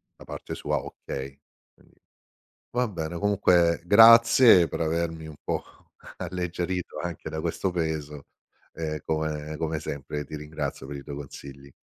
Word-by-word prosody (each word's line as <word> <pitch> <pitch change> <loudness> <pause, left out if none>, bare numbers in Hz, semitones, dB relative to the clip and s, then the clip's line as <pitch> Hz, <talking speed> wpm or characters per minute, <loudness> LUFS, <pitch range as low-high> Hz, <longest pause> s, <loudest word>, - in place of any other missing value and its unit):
da - - -14
parte - - -7
sua: - - -1
"Okay". 70 0 -7 0.3
Quindi, - - -26 0.8
va 125 0 0
bene, 85 -3 -4
comunque 90 -4 +3
grazie 115 -1 +8
per - - -5
avermi 80 0 -1
un 80 -2 -10
po' - - -1 0.5
alleggerito 90 0 -3
anche 85 -2 -5
da 80 0 -4
questo 85 +3 -1
peso, 80 -4 -3 0.5
e 75 -2 -4
come 75 -1 -2
come 80 -1 -1
sempre 75 0 -5
ti 75 - -7
ringrazio 75 -3 -5
per 70 0 -6
i 70 - -8
tuoi 70 0 -7
consigli. 70 -1 -10
80 Hz, 140 wpm, -26 LUFS, 75-90 Hz, 0.8 s, grazie